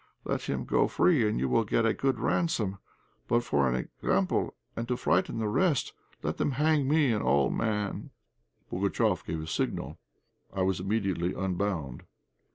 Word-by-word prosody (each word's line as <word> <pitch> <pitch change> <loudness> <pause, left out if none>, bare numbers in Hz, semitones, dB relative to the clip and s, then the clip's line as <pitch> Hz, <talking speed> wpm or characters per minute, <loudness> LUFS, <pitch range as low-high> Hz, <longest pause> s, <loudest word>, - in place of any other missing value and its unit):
Let - - -1
him - - -2
go - - +3
free, 105 +6 +3
and 105 - -1
you 65 - +1
will 90 - +3
get 115 +2 +1
a 115 - +3
good 135 -4 0
ransom; 110 - 0 0.5
but 120 +1 +2
for 70 - +2
an 65 - 0
example 95 +8 -1 0.2
and 115 0 -3
to 125 0 0
frighten 85 +4 +1
the 110 -1 -1
rest, 150 - +1 0.3
let - - -2
them 140 - 0
hang 150 0 +2
me, 145 -3 +3
an 105 - 0
old 70 -1 +2
man!" 105 -2 -2 0.6
Pugatchéf - - +1
gave 80 -1 -4
a - - -5
signal; 80 - -3 0.5
I 95 -1 -1
was 95 -1 +1
immediately 95 -3 -1
unbound. 90 -8 -2
105 Hz, 165 wpm, -29 LUFS, 90-120 Hz, 0.6 s, go